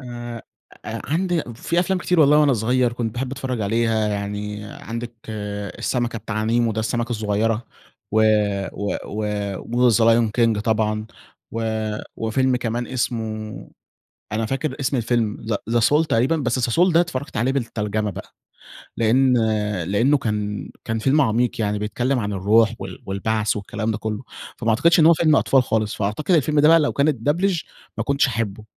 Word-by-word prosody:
آآ 120 -2 -7 0.4
أ - - -5
عندي 175 -1 +1
في 170 +8 0
أفلام 185 +1 0
كتير 180 -1 +1
والله 150 0 +6
وأنا 150 -2 +4
صغير 120 +1 +1
كنت 115 -2 -3
باحب 130 +1 -3
أتفرج 130 -3 -3
عليها، 110 +1 +1
يعني 105 0 -4
عندك 115 +3 -7 0.7
السمكة 120 -2 -1
بتاع 110 0 -3
نيمو 115 0 +2
ده 110 - -2
السمكة 120 +2 -2
الصغيرة، 110 +1 0 0.5
و 110 - +4 0.5
و 100 0 -2
و 105 +3 -1
وThe 110 - +3
Lion 115 -1 +4
King 115 -3 +3
طبعًا، 110 -1 0 0.5
و 115 0 -2 0.5
وفيلم 125 +3 +1
كمان 120 0 -2
اسمه 110 -4 -4 0.6
أنا 110 +1 -1
فاكر 135 +3 -2
اسم 135 0 0
الفيلم 115 -3 -1 0.2
زا 120 0 +2
The - - -1
soul 150 +6 +3
تقريبًا، 130 +8 +2
بس 130 -4 -1
The - - -1
soul 180 +4 +4
ده 165 - +5
اتفرجت 140 -6 -3
عليه 125 +4 +1
بالترجمة 110 -5 -2
بقى. - - -9 0.7
لأن 125 +3 +3 0.5
لأنه 115 - +2
كان 105 -3 -3 0.2
كان 110 0 -1
فيلم 135 +6 +3
عميق، 120 -2 +1
يعني 105 0 0
بيتكلم 125 +5 -1
عن 105 -2 -2
الروح 110 +4 +3
وال 95 -1 -8
والبعث 105 +3 -1
والكلام 110 +2 -3
ده 105 - -2
كله. 110 +2 -4 0.3
فما 115 - -1
أعتقدش 165 +10 +4
إن 155 - +6
هو 170 - +8
فيلم 155 -2 +3
أطفال 135 -1 +3
خالص، 110 -3 -1
فأعتقد 105 - -2
الفيلم 150 0 +2
ده 150 - +6
بقى 165 +1 +7
لو 150 - +1
كانت 140 -3 +1
اتبدلچ 175 +1 +1 0.3
ما - - -1
كنتش 140 0 +2
هاحبه. 110 -2 -3
115 Hz, 165 wpm, -22 LUFS, 110-135 Hz, 0.7 s, هو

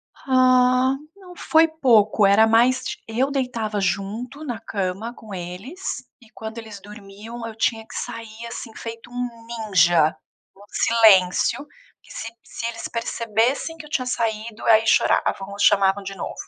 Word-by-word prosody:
Ah, 255 0 +3 0.2
não, 370 -3 -14
foi 325 -1 +4
pouco, 230 -10 +3
era 200 +3 +5
mais 240 +3 +3
ti - - -4
eu 250 +5 0
deitava 235 -6 -2
junto 220 +9 -3
na 245 -7 -4
cama 205 +1 -4
com 220 -4 -12
eles, 190 - -6 0.2
e 230 - -19
quando 220 +1 -8
eles 220 -3 -8
dormiam, 210 +3 -10
eu 225 - -8
tinha 225 0 -1
que - - -11
sair, 225 0 -6
assim, 230 -1 -8
feito 230 +1 -8
um 245 -2 -5
ninja. 180 -9 +2 0.4
Um 200 - -17
silêncio, 220 +3 +4 0.4
que - - -18
se 225 - -6
se 230 - -7
eles 230 -1 -5
percebessem 230 +7 -1
que 315 - -10
eu - - -14
tinha 275 -5 -1
saído, 225 -2 -3
aí 225 -1 +5
choravam, 200 -2 +2
chamavam 195 0 +4
de 195 0 -7
novo. - - -5
225 Hz, 155 wpm, -22 LUFS, 205-250 Hz, 0.4 s, era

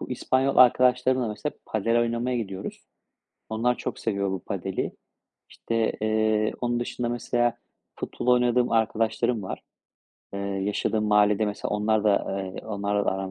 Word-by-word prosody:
bu - - -7
İspanyol 130 +2 +1
arkadaşlarımla 125 0 +4
mesela 110 +8 -4
padel 115 +2 +1
oynamaya 120 +2 0
gidiyoruz. 95 -4 -5 0.7
Onlar 120 +3 +1
çok - - -5
seviyor 100 -3 -1
bu 95 - -2
padeli. - - -3 0.6
İşte, 115 -1 -1
eee, 110 0 +1
onun 120 0 0
dışında 120 0 -3
mesela 120 0 0 0.4
futbol - - -5
oynadığım 125 0 +3
arkadaşlarım 115 0 +1
var, 95 - -5 0.7
eee, - - -3
yaşadığım 100 +2 -1
mahallede. 105 0 +3
Mesela 105 - -4
onlar 105 0 +1
da 100 -1 +1
eee, - - -8
onlarla 100 -1 -1
da - - +3
aram 95 0 -4
110 Hz, 140 wpm, -26 LUFS, 105-120 Hz, 0.7 s, arkadaşlarımla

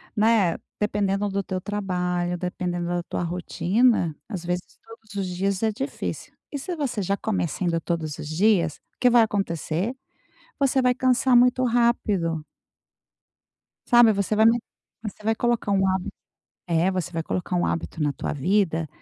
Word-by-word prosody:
né? 210 -5 +3 0.2
Dependendo 205 -1 0
do 200 0 -1
teu 185 -1 -4
trabalho, 180 -3 -2
dependendo 175 -1 -3
da 175 0 -1
tua 175 - -3
rotina, 180 +2 +1
às 190 -6 -5
vezes 180 +1 -2 0.2
todos 225 -2 -14
os 195 -1 -1
dias 190 +3 -1
é 220 - +3
difícil. 270 +6 -5 0.2
E 285 - -3
se 350 +5 -4
você 255 -8 -2
já 195 +2 0
começa 190 -4 -2
indo 170 -1 +1
todos 160 -3 -3
os - - -6
dias, 170 -1 +2 0.2
o - - -58
que 250 - +5
vai 240 -1 +6
acontecer? 195 +1 -2 0.6
Você 270 -1 +3
vai 250 -1 +3
cansar 255 0 +3
muito 250 +1 +4
rápido. 210 -9 +1 1.4
Sabe, 240 -2 +7
você 200 +2 0
vai 220 +1 +5
me 235 +1 +5 0.4
você 210 0 -7
vai 225 +1 +2
um - - -8
colocar 235 -3 0
hábit 190 -1 +1 0.6
é, 170 +2 +2
você 180 -2 -3
vai 165 0 -2
colocar 180 +2 -3
um 175 - +1
hábito 165 -1 -3
na 145 -1 +1
tua - - -4
vida, 165 0 +1
195 Hz, 165 wpm, -24 LUFS, 175-225 Hz, 1.4 s, Sabe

